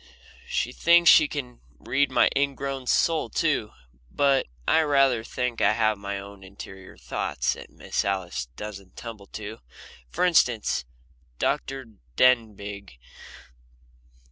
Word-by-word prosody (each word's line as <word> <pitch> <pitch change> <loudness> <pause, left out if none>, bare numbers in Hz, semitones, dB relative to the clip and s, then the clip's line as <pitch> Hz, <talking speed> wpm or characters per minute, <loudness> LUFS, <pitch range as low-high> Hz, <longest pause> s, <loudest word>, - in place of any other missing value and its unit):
She - - -1
thinks 170 0 +6
she 150 - +7
can 125 -5 -6 0.2
read 140 +2 0
my - - +4
ingrown 135 -1 -2
soul 165 +3 +2
too 145 -10 0 0.4
but 140 - +2 0.2
I 160 - +5
rather 135 -6 +3
think 125 0 -3
I - - +4
have 110 -2 +1
my 100 0 -4
own 100 0 -10
interior 95 0 -11
thoughts - - -2
that - - -11
Miss - - -3
Alice 90 -9 -2
doesn't 100 -1 -9
tumble 110 -4 -9
to. 110 +2 -8 0.5
For 180 - 0
instance, 125 - +2 0.5
Dr. 135 - -2 0.3
Denbigh. 105 - +1
115 Hz, 120 wpm, -25 LUFS, 100-135 Hz, 0.5 s, she